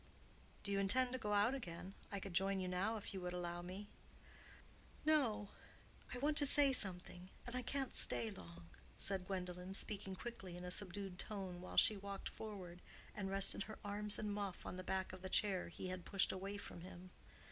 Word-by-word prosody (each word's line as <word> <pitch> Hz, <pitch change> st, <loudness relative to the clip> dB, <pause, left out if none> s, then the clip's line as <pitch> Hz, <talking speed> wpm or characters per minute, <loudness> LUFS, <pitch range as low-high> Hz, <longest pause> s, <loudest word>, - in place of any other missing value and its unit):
"Do 200 Hz, -, -2 dB
you 200 Hz, -, +2 dB
intend 245 Hz, +6 st, +3 dB
to 255 Hz, -, -2 dB
go 210 Hz, -2 st, -1 dB
out 205 Hz, +5 st, +4 dB
again? 185 Hz, -7 st, -6 dB, 0.2 s
I 200 Hz, -, -2 dB
could 195 Hz, -1 st, -6 dB
join 195 Hz, +2 st, +2 dB
you 185 Hz, -, -2 dB
now, 190 Hz, +5 st, 0 dB
if 205 Hz, -, -5 dB
you 190 Hz, -, -4 dB
would 180 Hz, 0 st, -3 dB
allow 175 Hz, -1 st, -3 dB
me." 185 Hz, +4 st, -7 dB, 1.2 s
"No; 250 Hz, -10 st, +3 dB, 0.6 s
I -, -, -3 dB
want 295 Hz, +3 st, +1 dB
to 290 Hz, -, +6 dB
say 280 Hz, -1 st, +8 dB
something, 185 Hz, -4 st, -4 dB, 0.2 s
and 245 Hz, -, -5 dB
I 255 Hz, -, 0 dB
can't 265 Hz, +1 st, -2 dB
stay 120 Hz, -2 st, +5 dB
long," 85 Hz, -2 st, -10 dB, 0.3 s
said 190 Hz, -2 st, +2 dB
Gwendolen, 180 Hz, 0 st, -4 dB
speaking 195 Hz, -2 st, -2 dB
quickly 185 Hz, -5 st, -7 dB
in 180 Hz, -, -7 dB
a 180 Hz, -, -4 dB
subdued 195 Hz, -1 st, -1 dB
tone, 190 Hz, -4 st, -4 dB
while 185 Hz, -, -8 dB
she 215 Hz, -, +7 dB
walked 200 Hz, 0 st, -5 dB
forward 185 Hz, -5 st, -7 dB, 0.3 s
and 195 Hz, -2 st, -3 dB
rested 195 Hz, +1 st, +5 dB
her 215 Hz, -, -8 dB
arms 205 Hz, 0 st, +1 dB
and 210 Hz, -1 st, -2 dB
muff 200 Hz, -3 st, -4 dB
on -, -, -4 dB
the 185 Hz, -, -5 dB
back 190 Hz, 0 st, -2 dB
of 185 Hz, -, -8 dB
the 185 Hz, -, -5 dB
chair 190 Hz, -2 st, +2 dB
he 185 Hz, +2 st, -6 dB
had 185 Hz, -1 st, -4 dB
pushed 195 Hz, +1 st, +2 dB
away 195 Hz, +2 st, -4 dB
from 175 Hz, -, -8 dB
him. 180 Hz, +1 st, -10 dB
195 Hz, 200 wpm, -40 LUFS, 180-210 Hz, 1.2 s, say